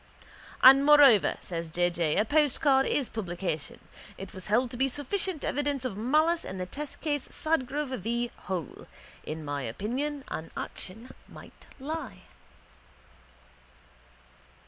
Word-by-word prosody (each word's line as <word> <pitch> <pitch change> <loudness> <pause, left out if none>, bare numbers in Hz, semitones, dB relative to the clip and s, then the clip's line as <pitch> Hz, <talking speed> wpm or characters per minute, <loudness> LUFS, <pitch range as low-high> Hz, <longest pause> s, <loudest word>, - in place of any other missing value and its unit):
—And 270 +2 +9
moreover, 285 -8 +6
says 165 -2 -5
J. 175 +2 +1
J., 165 -3 0
a 210 - +3
postcard 285 -1 +3
is 275 -4 0
publication. 175 -7 -4 0.4
It 195 - -9
was 185 -1 -5
held 235 +4 +2
to - - -7
be 265 +2 +2
sufficient 310 +5 -1
evidence 285 -2 -1
of 245 - -3
malice 310 +10 +2
in 190 - -6
the 185 - -3
testcase 290 - -4
Sadgrove 290 -3 -1
v. 235 +4 -2 0.2
Hole. 180 -7 -5 0.4
In 155 0 -6
my 145 -1 -3
opinion 250 - -3
an 160 - -5
action 225 +7 -7 0.2
might - - -15
lie. 310 +4 -6
250 Hz, 125 wpm, -28 LUFS, 185-290 Hz, 0.4 s, And